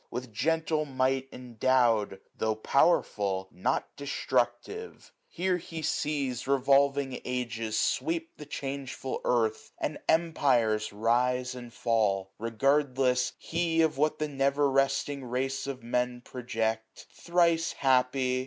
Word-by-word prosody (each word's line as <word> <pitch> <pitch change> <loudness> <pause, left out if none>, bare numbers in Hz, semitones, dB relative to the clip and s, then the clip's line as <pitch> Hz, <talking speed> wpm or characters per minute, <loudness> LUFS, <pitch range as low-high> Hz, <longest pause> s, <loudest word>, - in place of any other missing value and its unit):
vnth 125 0 -5
gentle 155 +5 0
might 135 -1 0
endowM; 120 -4 +1 0.2
ITio' 110 0 -1
powerful, 100 - +2
not 120 +9 -2
destructive! 135 - -2
Here 180 +1 0
he 165 -2 -7
sees 140 -5 -1
SUMMER. 140 +2 +2
77 - - -7
Revolving 140 0 +2
ages 115 -3 -2
sweep 330 - -1
the 150 - -10
changeful 135 -2 -5
earth. 110 -3 0
And - - -3
empires 125 -10 +2
rise 125 +4 +1
and 120 -1 -9
fall; 100 -5 0
regardless 130 +2 +1
he 165 0 -1
725 160 -1 +4
Of 155 - -16
what 155 +1 +2
the 155 - -1
never 140 0 +1
resting 135 +1 +1
race 135 +2 -2
of 130 -3 -5
Men 125 +1 -1
Project: 115 -3 -3
thrice 170 -1 +2
happy 130 -1 +2
130 Hz, 125 wpm, -29 LUFS, 120-145 Hz, 0.2 s, 725